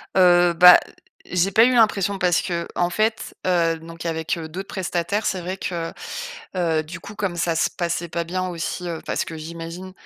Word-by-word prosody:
Heu, 175 -2 +5
bah, 180 +1 +9 0.5
j'ai 180 +2 0
pas 225 +4 +6
eu 255 - +3
l'impression. 200 -4 +3
Parce 180 -2 +2
qu'en 175 0 -2
fait, 215 +4 -1
heu, 170 -3 +2
donc 165 +1 -10
avec, 160 +1 -2
heu, 160 -1 -6
d'autres 190 +4 -6
prestataires, 185 +3 -2
c'est 185 - -1
vrai 185 +2 -4
que, 170 -3 -4 0.7
heu, 165 -3 +1
du 170 +3 -8
coup, 205 - -10
comme 195 -4 -2
ça 165 0 0
se - - +2
passait 170 0 -3
pas 170 +1 -2
bien 185 +2 -2
aussi, 175 +1 -4
heu. 165 -2 -4
Parce - - -1
que 160 - -7
j'imagine 165 +3 -8
175 Hz, 190 wpm, -22 LUFS, 165-185 Hz, 0.7 s, bah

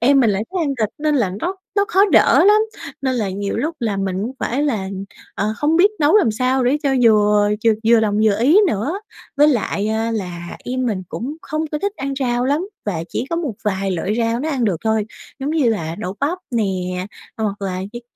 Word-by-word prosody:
em 270 +3 +5
mình 225 -4 +4
lại 200 +1 0
thích 375 - -2
ăn 280 -1 -1
thịt 215 - +2
nên 300 0 +1
là 215 -8 +1
nó 375 +2 -2 0.2
nó 400 - +4
khó 395 -2 +4
đỡ - - +6
lắm. 420 +2 +6 0.4
Nên 260 -1 0
là 210 -5 -1
nhiều 200 +1 -3
lúc 320 +2 -2
là 215 -4 -1
mình 195 -1 -2
cũng 235 +5 -3
phải 270 +2 -1
là, 220 -10 -1 0.5
ờ, 210 +2 -1
không 305 +2 +1
biết 390 +5 +5
nấu 300 +7 +5
làm 360 - +4
sao 255 +3 +1
để 260 +4 +3
cho 280 - +1
vừa 210 -2 +4 0.2
vừa 225 - +6 0.2
vừa 235 -1 +6
lòng 210 -2 +1
vừa 205 -2 +3
ý 300 - +5
nữa. 305 - -1 0.4
Với 295 +1 +6
lại, 215 -6 0
ơ, 220 +1 0
là 180 -6 -5
em 255 0 -2
mình 195 -5 -1
cũng 280 +7 -5
không 310 +1 -3
có 300 - 0
thích 405 +3 -2
ăn 275 0 -3
rau 245 -1 0
lắm, 295 +9 0 0.2
và 165 -5 -2
chỉ 245 - -3
có 335 - 0
một 305 -9 -2
vài 195 -1 -1
loại 185 +4 -1
rau 230 +1 0
nó 310 - -2
ăn 260 -5 0
được 195 -5 +1
thôi, 220 -1 +1 0.3
giống 275 +2 -2
như 310 -6 +2
là 165 -6 -2
đậu 190 -2 -4
bắp 320 +6 0
nè, 230 -4 +1 0.7
à, 220 - -2
hoặc 205 -1 -3
là 185 -1 -2
như 240 - -6
235 Hz, 235 wpm, -20 LUFS, 205-290 Hz, 0.7 s, đỡ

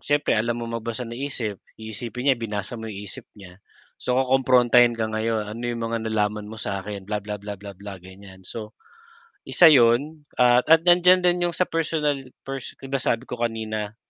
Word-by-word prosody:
Siyempre 145 0 +1
alam 115 +2 +1
mong 115 0 -4
magbasa 115 +2 -4
ng 115 +1 -7
isip, 120 -8 -4 0.2
iisipin 120 +4 -2
niya 120 - -4
binasa 105 +1 -4
mo 110 - -6
isip 100 -1 -8
niya, 95 -1 -14 0.4
so 125 - 0
kukomprontahin 125 -2 +4
ka 115 - -1
ngayon, 110 0 -1
ano 115 +2 -7
yung 120 -1 -3
mga 115 - 0
nalaman 105 -1 -1
mo 110 - -9
sakin, 100 -1 -5
bla, 105 +1 -3
bla, 105 +1 -5
bla, 100 0 -8
bla, 100 -2 -9
bla, 100 -1 -9
ganyan, 95 +1 -14
so 110 -1 -7 0.8
isa 170 -3 +7
yun, 145 +4 +3
at 125 0 +4 0.2
nandiyan 180 +1 +5
din 175 0 +2
yung 170 - -4
sa - - +3
personal 155 -4 -1 0.2
per 135 0 -5
'di 135 +1 -11
ba 135 - +1
sabi 120 -1 0
ko 125 -2 -7
kanina. 110 -2 -3
115 Hz, 185 wpm, -24 LUFS, 105-130 Hz, 0.8 s, isa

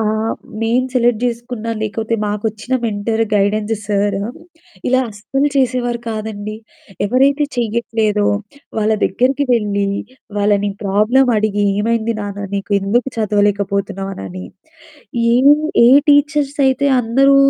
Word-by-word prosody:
ఆహ్, 220 +1 0 0.3
నేను 240 +3 +1
సెలెక్ట్ 240 -3 +2
చేసుకున్నా, 235 -1 -3
లేకపోతే 220 +2 -2
మాకొచ్చిన 215 +4 -2
మెంటరు 220 +1 0
గైడెన్స్ 210 +2 +1
సరు 200 -1 0 0.7
ఇలా 255 +1 +3
అస్సలు 270 +7 -1
చేసేవారు 250 -3 0
కాదండి. 215 -1 -4 0.5
ఎవరైతే 275 +6 +3
చెయ్యట్లేదో 220 -2 0 0.5
వాళ్ళ 215 +1 +2
దగ్గరికి 260 +8 +1
వెళ్లి, 205 -3 +1 0.5
వాళ్ళని 205 0 +2
ప్రాబ్లమ్ 220 +7 +3
అడిగి, 205 -1 +1 0.2
"ఏమైంది 230 +1 0
నాన్న? 205 0 -5
నీకు 200 +1 -4
ఎందుకు 235 +7 0
చదవలేకపోతున్నావు?" 200 -2 0
అనని 95 -1 -7 0.9
ఏ - - +4 0.5
ఏ - - +7 0.2
టీచర్స్ 290 -1 +3
అయితే 265 +2 +2
అందరూ 270 +4 +3
220 Hz, 110 wpm, -17 LUFS, 205-245 Hz, 0.9 s, ఏ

